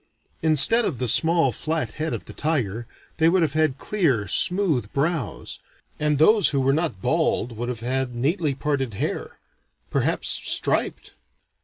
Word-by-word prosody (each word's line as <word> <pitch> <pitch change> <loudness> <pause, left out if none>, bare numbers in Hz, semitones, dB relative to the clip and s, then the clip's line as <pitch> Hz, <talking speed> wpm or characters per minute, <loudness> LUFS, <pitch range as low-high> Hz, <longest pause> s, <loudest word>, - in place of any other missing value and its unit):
Instead 160 - +5
of 165 - -2
the 125 - -2
small 165 +3 +3
flat 155 -2 -3
head 155 +1 -3
of - - -5
the - - -10
tiger, 120 -8 -2 0.3
they 160 0 +4
would 180 0 +2
have 150 -3 -1
had 155 -4 +1
clear 140 - 0
smooth 165 - +2
brows; 145 - -2 0.4
and 150 -1 +1
those 205 +6 +4
who 140 - -1
were 135 +1 +2
not 155 - -2
bald 115 0 0
would 120 +2 -4
have 120 -2 -5
had 130 0 -2
neatly 145 +3 -1
parted 135 -6 -2
hair - - -4 0.5
perhaps - - -1
striped. - - -1
145 Hz, 155 wpm, -23 LUFS, 125-165 Hz, 0.5 s, Instead